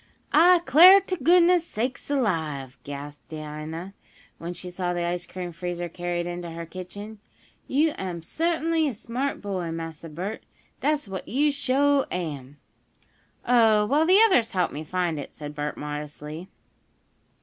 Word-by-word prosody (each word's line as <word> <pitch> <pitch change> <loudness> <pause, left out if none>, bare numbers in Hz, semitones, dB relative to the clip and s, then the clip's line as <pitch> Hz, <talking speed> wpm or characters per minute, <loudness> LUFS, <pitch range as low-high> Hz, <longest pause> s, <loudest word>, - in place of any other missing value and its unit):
"I 345 +3 +6
'clar 350 +9 +9
t' 375 -1 -3
goodness 345 +3 +5
sakes 255 -4 -4
alive!" 160 - -1
gasped 145 +1 -8
Dinah, 155 +4 -7 0.5
when 170 +1 -5
she 180 +1 -7
saw 180 0 -2
the 175 - -1
ice 175 0 -3
cream 180 -1 -6
freezer 175 0 -4
carried 175 0 -3
into 175 0 -5
her 165 0 -6
kitchen, 205 +5 -9 0.5
"yo' 305 +4 +2
am 180 -3 -4
suttinly 325 - 0
a 250 - -6
smart 245 +5 -3
boy, 185 -4 -3
Massa 165 0 -6
Bert 185 +8 -5 0.4
dat's 295 -4 0
what 190 -1 -6
yo' 290 +5 +2
suah 280 0 +2
am!" 145 -6 -5 0.9
"Oh, 225 -4 +5
well, 295 +8 +2
the 375 +3 +6
others 250 - +3
helped 180 -2 0
me 150 +2 -5
find 170 -1 -1
it," 140 - -8
said 150 -1 -7
Bert, 150 0 -4
modestly. 150 +3 -6
180 Hz, 150 wpm, -25 LUFS, 165-275 Hz, 0.9 s, clar